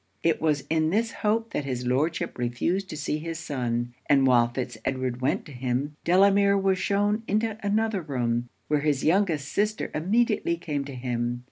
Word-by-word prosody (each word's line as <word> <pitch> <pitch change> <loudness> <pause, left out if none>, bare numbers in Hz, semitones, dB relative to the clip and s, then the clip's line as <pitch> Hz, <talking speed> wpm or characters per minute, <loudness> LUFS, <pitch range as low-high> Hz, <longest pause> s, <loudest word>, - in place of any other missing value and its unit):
It 165 -1 +2
was 150 -3 +1
in 160 0 +1
this 225 +5 +1
hope 225 +1 -1
that - - -1
his 125 -2 -3
Lordship 145 +5 0
refused 170 +11 -1
to - - -6
see 150 0 -2
his 165 +1 -5
son; 120 -7 -2
and 135 -2 +4
while 120 -2 +5
Fitz 120 0 -4
Edward 130 -1 -2
went 130 - 0
to - - -11
him, 130 +3 -2
Delamere 200 +2 +5
was 190 -1 +1
shewn 205 +3 +1
into 215 +1 0
another 210 0 0
room, 120 -5 -1 0.2
where 150 -1 +2
his 145 -2 +1
youngest 165 -5 +2
sister 215 +1 0
immediately 200 +1 +1
came 150 -5 -3
to 140 -1 -7
him. 120 -1 -2
155 Hz, 175 wpm, -26 LUFS, 130-195 Hz, 0.2 s, while